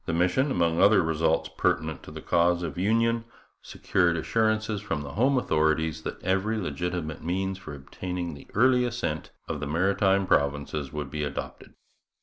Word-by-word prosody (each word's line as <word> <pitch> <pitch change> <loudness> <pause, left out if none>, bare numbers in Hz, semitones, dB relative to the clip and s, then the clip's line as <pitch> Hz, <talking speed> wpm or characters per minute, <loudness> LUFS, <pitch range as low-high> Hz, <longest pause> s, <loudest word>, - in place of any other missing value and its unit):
The 85 - -1
mission, 90 - +2
among 85 -7 +1
other 100 -2 +6
results 80 0 +1
pertinent 80 0 0
to - - -11
the - - -9
cause 85 +1 +2
of 80 -4 -4
union, 115 +4 +1 0.4
secured 85 -3 0
assurances 110 +3 0
from 80 -8 -3
the 70 - -7
home 130 +5 +2
authorities 80 -5 +1
that - - -6
every 95 +4 +1
legitimate 85 -2 -3
means 95 +2 -2
for 75 -6 -8
obtaining 85 +5 -5
the 70 - -12
early 125 +3 +4
assent 120 -1 -3 0.2
of - - -3
the 75 - -4
Maritime 95 +4 +2
Provinces 70 -2 0
would 75 -3 -5
be 75 -1 -2
adopted. 70 -2 -6
90 Hz, 160 wpm, -27 LUFS, 80-105 Hz, 0.4 s, other